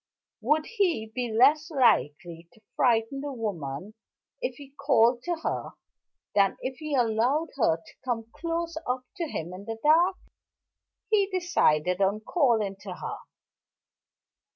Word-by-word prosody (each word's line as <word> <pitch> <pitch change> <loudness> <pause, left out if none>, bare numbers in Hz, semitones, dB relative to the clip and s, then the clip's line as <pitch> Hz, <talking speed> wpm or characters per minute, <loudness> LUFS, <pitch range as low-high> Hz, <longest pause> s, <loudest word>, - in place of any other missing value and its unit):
Would 300 +7 +2
he 345 - 0
be 245 -1 -2
less 285 +7 +4
likely 170 - +1
to 220 - -23
frighten 235 +2 +2
the 290 0 -4
woman 195 - -5 0.5
if - - -2
he 280 -2 -13
called 255 -4 +3
to 350 - 0
her - - -3 0.6
than 200 -1 +3
if 260 0 -4
he 305 -2 -3
allowed 245 +6 +1
her 165 -11 +3
to 165 - -18
come 235 -3 -2
close 335 0 -3
up 250 +1 -1
to 340 - -1
him 175 - -5
in 190 +2 -9
the 225 +1 -5
dark? 335 +5 +5 1.0
He 405 -2 +4
decided 200 - +1
on 200 +2 +2
calling 220 - +1
to 190 -2 -8
her. - - -5
245 Hz, 140 wpm, -27 LUFS, 205-305 Hz, 1.0 s, dark